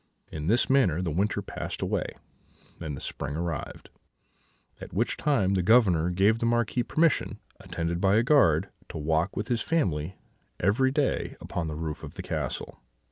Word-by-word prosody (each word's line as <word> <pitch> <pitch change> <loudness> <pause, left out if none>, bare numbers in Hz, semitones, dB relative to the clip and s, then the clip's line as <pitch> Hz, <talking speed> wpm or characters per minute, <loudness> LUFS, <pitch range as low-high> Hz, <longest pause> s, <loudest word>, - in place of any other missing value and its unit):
"In 75 0 -5
this 115 +5 +3
manner 110 - +3
the 85 - -1
winter 100 +6 0
passed - - -5
away, - - -1 0.7
and 75 -4 -4
the - - -7
spring 70 - -4
arrived, 85 +1 -5 0.9
at - - -10
which 115 +5 +1
time 105 -11 +1
the 95 - +2
Governor 90 -5 +4
gave 100 +5 +3
the 115 - 0
Marquis 120 +1 +1
permission, 160 +5 +1 0.2
attended 85 +1 -3
by 95 0 +4
a 110 - +4
guard, 100 - +4 0.2
to - - -6
walk 80 +4 0
with 105 - -2
his 120 -2 +1
family 95 - 0 0.4
every 110 +8 +3
day 140 0 0
upon 85 -2 -4
the 75 - -4
roof 80 -1 -4
of - - -9
the - - -6
castle. - - -4
95 Hz, 170 wpm, -27 LUFS, 80-120 Hz, 0.9 s, Governor